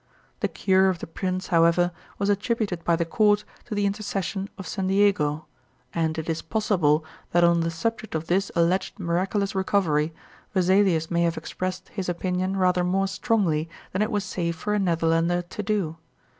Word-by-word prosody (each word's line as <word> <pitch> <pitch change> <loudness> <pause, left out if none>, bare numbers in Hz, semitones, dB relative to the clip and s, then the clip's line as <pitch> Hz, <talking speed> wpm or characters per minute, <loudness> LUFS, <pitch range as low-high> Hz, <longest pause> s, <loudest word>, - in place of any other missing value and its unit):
The - - +1
cure 190 0 +3
of 185 - -1
the - - -6
prince, 185 +2 -3
however, 170 +1 +4 0.3
was 200 - -1
attributed 205 -3 0
by 170 - +3
the 170 0 0
court 205 +4 +3 0.2
to 215 - -5
the 205 0 +1
intercession 200 -1 -2
of 190 - -7
St. 190 +3 -2
Diego, 185 -7 +2 0.5
and 160 -1 0
it 160 - -4
is 165 -1 -1
possible 175 -8 +1 0.3
that 175 0 +5
on 170 0 +5
the 165 0 0
subject 220 +4 -3
of 160 0 -2
this 190 +3 +1
alleged 170 +3 +1
miraculous 190 +3 0
recovery 175 -6 +1 0.4
Vesalius 185 -3 +3
may 170 0 +2
have 170 -1 +1
expressed 185 0 -4
his 190 -3 -4
opinion 185 +2 -1
rather 180 -1 +3
more 190 +2 +1
strongly 190 -6 0 0.2
than 190 - -1
it 215 - +1
was 205 -1 0
safe 170 -3 -2
for 210 +6 -2
a 210 - +2
Netherlander 170 -1 +1
to 175 +4 -6
do. 195 -6 -1
185 Hz, 175 wpm, -25 LUFS, 170-200 Hz, 0.5 s, that